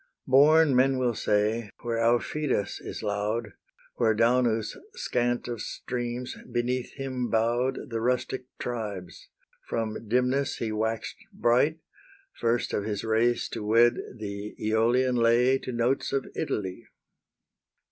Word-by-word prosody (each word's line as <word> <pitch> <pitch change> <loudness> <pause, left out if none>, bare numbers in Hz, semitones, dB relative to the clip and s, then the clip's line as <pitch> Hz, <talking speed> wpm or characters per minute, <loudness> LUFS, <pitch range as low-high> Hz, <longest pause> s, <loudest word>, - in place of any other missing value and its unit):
"Born," 145 +2 +6
men 130 +1 +4
will 125 -2 +1
say, 105 +1 0
"where 115 -1 -1
Aufidus 120 0 0
is - - -6
loud, 105 +1 -2 0.4
Where 110 -3 +3
Daunus, 115 -1 +2 0.2
scant 120 - -1
of 120 -3 -4
streams, 120 0 -4 0.2
beneath 120 +1 -1
him 130 -3 -3
bow'd 120 +4 0
The 115 -1 -2
rustic 125 +1 -1
tribes, 105 -7 -5 0.4
from 110 -1 -3
dimness 125 +4 +1
he 115 -2 -2
wax'd 110 +1 -2
bright, 135 +7 +2 0.5
First 115 0 0
of 105 - 0
his 105 -1 -3
race 115 +2 +2
to - - -5
wed 115 +3 +4 0.2
the 100 -1 -6
Aeolian 120 +4 +2
lay 120 +3 +4
To 130 - -6
notes 120 +3 0
of 135 -1 0
Italy." 100 - -3
120 Hz, 125 wpm, -27 LUFS, 110-125 Hz, 0.5 s, Born